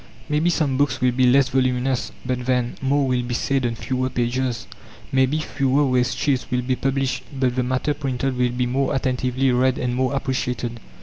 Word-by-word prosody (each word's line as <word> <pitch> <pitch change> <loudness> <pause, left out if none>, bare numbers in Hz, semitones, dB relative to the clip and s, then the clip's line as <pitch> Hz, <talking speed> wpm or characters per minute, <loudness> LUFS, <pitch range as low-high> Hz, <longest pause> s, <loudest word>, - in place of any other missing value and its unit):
Maybe 150 +3 +2
some 150 -6 +1
books 145 +1 +1
will 125 0 +3
be 125 +1 +3
less 135 +1 +4
voluminous; 130 0 0
but 125 -1 -2
then, 125 -2 +1
more 135 +1 +2
will 125 -1 +1
be 120 0 -3
said 135 0 0
on 115 - -3
fewer 130 +2 -2
pages. 120 -1 -1 0.5
Maybe 130 +2 +2
fewer 140 -2 +1
waste 125 -1 +1
sheets 135 -3 0
will 125 0 0
be 130 +1 0
published; 135 0 -1
but 130 -3 0
the 130 - +1
matter 130 +4 0
printed 135 -2 -2
will 125 0 +2
be 125 +1 -1
more 135 +3 0
attentively 130 0 0
read 130 +1 +2
and 125 -1 -1
more 130 +2 0
appreciated. 125 -3 -2
130 Hz, 190 wpm, -22 LUFS, 125-135 Hz, 0.5 s, less